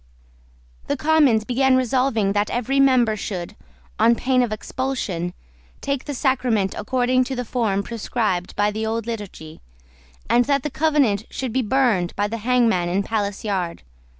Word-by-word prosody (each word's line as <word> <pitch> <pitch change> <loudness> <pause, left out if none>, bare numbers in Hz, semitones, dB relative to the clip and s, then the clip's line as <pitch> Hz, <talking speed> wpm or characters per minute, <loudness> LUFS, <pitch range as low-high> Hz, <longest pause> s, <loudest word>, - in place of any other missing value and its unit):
The 285 - -1
Commons 295 -7 +3
began 265 +2 +2
by - - +5
resolving 250 -5 +1
that 205 0 0
every 255 +3 0
member 255 -5 +4
should, 190 -3 -5 0.4
on 230 +2 +5
pain 255 +2 +1
of 240 -3 0
expulsion, 215 -7 -3 0.5
take 275 -2 -3
the 290 - -4
sacrament 245 -8 +1
according 255 +3 +1
to 265 - -4
the 250 0 -3
form 215 -5 0
prescribed 210 -5 -2
by 205 0 +2
the 215 +1 -4
old 225 0 -2
Liturgy, 205 -9 -7 0.7
and 245 0 +3
that 280 -2 +1
the 300 - -3
Covenant 270 -8 +1
should 255 -4 -4
be 260 - +2
burned 225 -7 +1
by 205 +1 0
the 230 +2 -4
hangman 225 -6 +2
in 190 +3 0
Palace 205 -2 -2
Yard. 185 -5 -3
230 Hz, 160 wpm, -22 LUFS, 205-260 Hz, 0.7 s, by